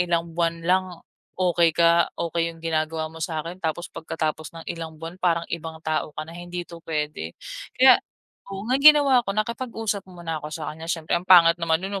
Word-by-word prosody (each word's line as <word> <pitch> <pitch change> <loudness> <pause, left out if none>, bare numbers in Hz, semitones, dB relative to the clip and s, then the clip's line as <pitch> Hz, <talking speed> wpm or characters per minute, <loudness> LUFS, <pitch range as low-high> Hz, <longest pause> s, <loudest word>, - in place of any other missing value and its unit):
ilang 170 -1 +1
buwan 170 0 0
lang 185 +2 +3 0.5
okey 170 -3 +2
ka, 170 0 +4
okey 170 0 -1
'yung 165 0 -11
ginagawa 160 0 -1
mo 165 - -11
sa'kin. 165 +2 -4
Tapos, 165 +1 -3
pagkatapos 155 0 -4
ng 165 - -9
ilang 165 -2 -7
buwan 165 +3 -9
parang 170 -2 +1
ibang 165 -1 -5
tao 155 0 -1
ka 155 - -4
na, 165 - -12
hindi 175 +1 -6
ito 170 -1 -12
puwede. 150 - -4 0.4
Kaya, - - +7 0.5
oo 195 0 -6
nga 255 +4 +1
ang - - -6
ginawa 285 -3 +7
ko, 195 -4 -4
nakipag-usap 225 -2 -2
mo 175 -2 -12
na 165 -2 -3
ako 150 - -6
sa 155 0 -5
kanya. 160 +1 -10
Siyempre 165 -2 -3
ang 180 +1 -15
pangit 170 -2 +7
naman 165 -1 +2
no'n 195 0 -3
170 Hz, 200 wpm, -24 LUFS, 160-180 Hz, 0.5 s, Kaya